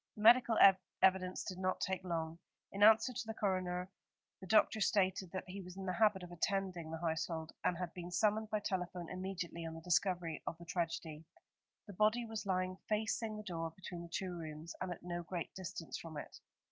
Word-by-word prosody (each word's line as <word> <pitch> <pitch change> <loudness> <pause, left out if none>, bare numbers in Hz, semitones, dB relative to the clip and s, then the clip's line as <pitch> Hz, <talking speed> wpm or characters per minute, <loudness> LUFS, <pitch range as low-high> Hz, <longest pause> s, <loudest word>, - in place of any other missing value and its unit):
The 210 - -6
medical 235 0 +7 0.5
evidence 185 -1 +3
did 185 -1 -5
not 185 0 0
take 190 -1 -1
long. 165 -2 -2 0.3
In 200 - -5
answer 220 +4 +7
to 225 - -4
the 225 - -4
coroner, 185 -2 -1 0.5
the 190 - -10
doctor 215 +2 +4
stated 190 -2 +2
that 185 - -3
he 195 +2 -6
was 180 0 -10
in 195 - -5
the 185 - -1
habit 210 -2 +3
of 175 - -9
attending 180 -2 -1
the 165 - -4
household, 160 0 -2
and 175 - +2
had 180 -2 -4
been 175 -1 -6
summoned 215 +4 +2
by 215 -1 0
telephone 180 -3 -3
immediately 185 -2 -4
on 165 0 -5
the 165 - -8
discovery 175 -1 +1
of 165 - -3
the 170 - -11
tragedy. 165 -3 -3 0.6
The 205 - -9
body 215 +5 +3
was 220 -2 -5
lying 185 0 0
facing 220 0 0
the 215 - -6
door 165 -4 -3
between 180 -1 -7
the 170 - -9
two 180 +1 -3
rooms, 160 0 -6
and 185 -1 -2
at 175 - -7
no 175 0 -3
great 170 0 -5
distance 175 -3 -6
from 160 -2 -8
it. - - -7
185 Hz, 200 wpm, -36 LUFS, 170-200 Hz, 0.6 s, medical